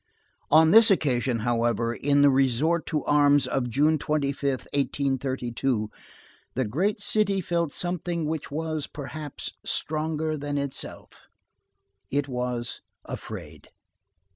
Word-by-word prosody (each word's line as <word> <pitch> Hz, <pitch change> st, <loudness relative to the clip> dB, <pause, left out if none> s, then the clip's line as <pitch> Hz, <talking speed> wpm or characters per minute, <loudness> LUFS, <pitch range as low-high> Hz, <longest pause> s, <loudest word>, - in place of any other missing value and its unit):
On 160 Hz, +1 st, +6 dB
this 225 Hz, +1 st, +8 dB
occasion, 130 Hz, -, +1 dB
however, 115 Hz, 0 st, 0 dB
in 145 Hz, +3 st, +2 dB
the 145 Hz, -, +6 dB
resort 135 Hz, +6 st, +2 dB
to 150 Hz, -2 st, -1 dB
arms 145 Hz, -1 st, +4 dB
of 125 Hz, -2 st, -1 dB
June 150 Hz, +6 st, +2 dB
5th, -, -, -10 dB
1832, 135 Hz, -4 st, -1 dB, 0.6 s
the 130 Hz, 0 st, 0 dB
great 185 Hz, -, 0 dB
city 205 Hz, -1 st, +2 dB
felt 170 Hz, -3 st, -1 dB
something 175 Hz, -1 st, -2 dB
which 155 Hz, 0 st, -3 dB
was, 155 Hz, 0 st, -3 dB
perhaps, 145 Hz, 0 st, -6 dB
stronger 155 Hz, 0 st, -1 dB
than 145 Hz, 0 st, -3 dB
itself. 140 Hz, -1 st, -5 dB, 0.8 s
It 145 Hz, 0 st, 0 dB
was 125 Hz, -2 st, -3 dB, 0.2 s
afraid. -, -, -8 dB
145 Hz, 115 wpm, -26 LUFS, 130-160 Hz, 0.8 s, this